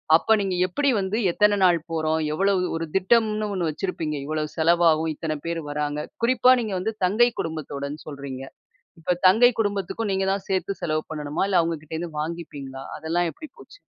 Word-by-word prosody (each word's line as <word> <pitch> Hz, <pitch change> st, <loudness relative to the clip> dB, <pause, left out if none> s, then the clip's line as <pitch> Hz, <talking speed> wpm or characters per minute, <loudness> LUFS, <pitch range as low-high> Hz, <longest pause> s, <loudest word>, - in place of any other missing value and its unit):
அப்ப, 220 Hz, +6 st, +4 dB
நீங்க 190 Hz, -2 st, -1 dB
எப்படி 280 Hz, +10 st, 0 dB
வந்து 195 Hz, +3 st, -1 dB
எத்தனை 210 Hz, +2 st, +3 dB
நாள் 175 Hz, -2 st, +5 dB
போறோம்? 160 Hz, 0 st, 0 dB
எவ்ளோ? 195 Hz, +4 st, +2 dB, 0.2 s
ஒரு 165 Hz, -, -3 dB
திட்டம்னு 215 Hz, +2 st, +2 dB
ஒண்ணு 175 Hz, -4 st, -1 dB
வச்சிருப்பீங்க. 155 Hz, -2 st, -3 dB
இவ்வளோ 155 Hz, +1 st, -2 dB
செலவாகும், 165 Hz, -1 st, +3 dB
இத்தனை 155 Hz, -1 st, -3 dB
பேர் 170 Hz, 0 st, -2 dB
வராங்க, 150 Hz, 0 st, -2 dB, 0.2 s
குறிப்பா 255 Hz, +1 st, +5 dB
நீங்க 215 Hz, -3 st, -3 dB
வந்து 220 Hz, +4 st, -2 dB
தங்கை 235 Hz, +6 st, +4 dB
குடும்பத்தோடுன்னு 150 Hz, -2 st, -4 dB
சொல்றீங்க. 140 Hz, -3 st, -7 dB, 0.6 s
இப்ப 175 Hz, +2 st, 0 dB
தங்கை 225 Hz, +6 st, +7 dB
குடும்பத்துக்கும் 205 Hz, +1 st, -1 dB
நீங்க 190 Hz, 0 st, 0 dB
தான் 195 Hz, 0 st, -3 dB
சேத்து 190 Hz, 0 st, 0 dB
செலவு 155 Hz, -1 st, 0 dB
பண்ணணுமா? 150 Hz, +2 st, -2 dB
இல்ல 190 Hz, -3 st, +4 dB
அவுங்ககிட்டேருந்து 160 Hz, 0 st, -4 dB
வாங்கிப்பீங்களா? 145 Hz, -5 st, -6 dB
அதெல்லாம் 170 Hz, +2 st, 0 dB
எப்படி 310 Hz, -, -10 dB
போச்சு? -, -, -15 dB
170 Hz, 160 wpm, -24 LUFS, 155-200 Hz, 0.6 s, தங்கை